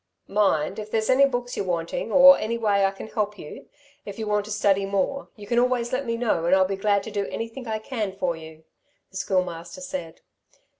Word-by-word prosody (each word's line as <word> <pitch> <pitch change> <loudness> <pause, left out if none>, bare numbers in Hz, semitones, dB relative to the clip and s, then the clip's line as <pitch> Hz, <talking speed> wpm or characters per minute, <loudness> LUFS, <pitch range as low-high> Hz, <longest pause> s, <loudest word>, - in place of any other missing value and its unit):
"Mind, 195 -2 +1
if 215 0 -7
there's 220 +1 +1
any 275 +2 +6
books 245 -2 -3
you're - - -2
wanting, 170 +5 -2
or 275 +1 +9
any 230 +2 -2
way 205 -3 +2
I - - +3
can 195 +2 -9
help 210 -1 -2
you, 150 - -10 0.4
if 200 - -8
you 220 - -3
want 210 -1 0
to 215 - -8
study 200 -2 +2
more, 200 +8 -2
you 210 - -11
can 235 +3 +1
always 245 -1 0
let 260 0 -1
me 230 0 -1
know, 215 -8 0
and 185 - +5
I'll 190 0 +4
be 195 +1 -2
glad 200 0 +1
to 220 - -7
do 200 -1 -2
anything 230 +2 -6
I 220 -1 -1
can 215 -2 -4
for 180 -3 -1
you," 160 0 -12 0.5
the 190 - -8
Schoolmaster 180 -3 -2
said. 180 -3 -6
205 Hz, 220 wpm, -24 LUFS, 190-230 Hz, 0.5 s, or